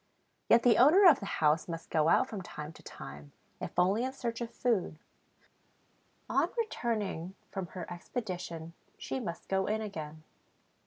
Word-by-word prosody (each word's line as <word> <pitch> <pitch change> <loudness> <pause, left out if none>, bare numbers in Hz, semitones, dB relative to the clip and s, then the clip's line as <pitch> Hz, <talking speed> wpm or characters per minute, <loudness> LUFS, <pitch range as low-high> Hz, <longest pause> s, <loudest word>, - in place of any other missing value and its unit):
Yet 230 0 +6
the 235 -3 +5
owner 320 +11 +7
of 305 -6 +7
the 200 - -6
house 155 -3 +2
must 165 -1 -6
go 155 0 +3
out 255 - +4
from 210 -6 -5
time 150 -3 -7
to - - -15
time, 70 +1 -10 0.3
if - - -6
only 190 +6 +3
in 260 - -1
search 235 -3 -4
of 235 - -3
food; 220 -12 0 1.3
on - - +2
returning 215 - -2 0.2
from 190 -3 -4
her 175 - -4
expedition, 175 -4 -5 0.2
she - - -4
must 170 -8 -6
go 190 0 +1
in 215 +1 0
again. 155 -7 -6
190 Hz, 160 wpm, -31 LUFS, 165-235 Hz, 1.3 s, owner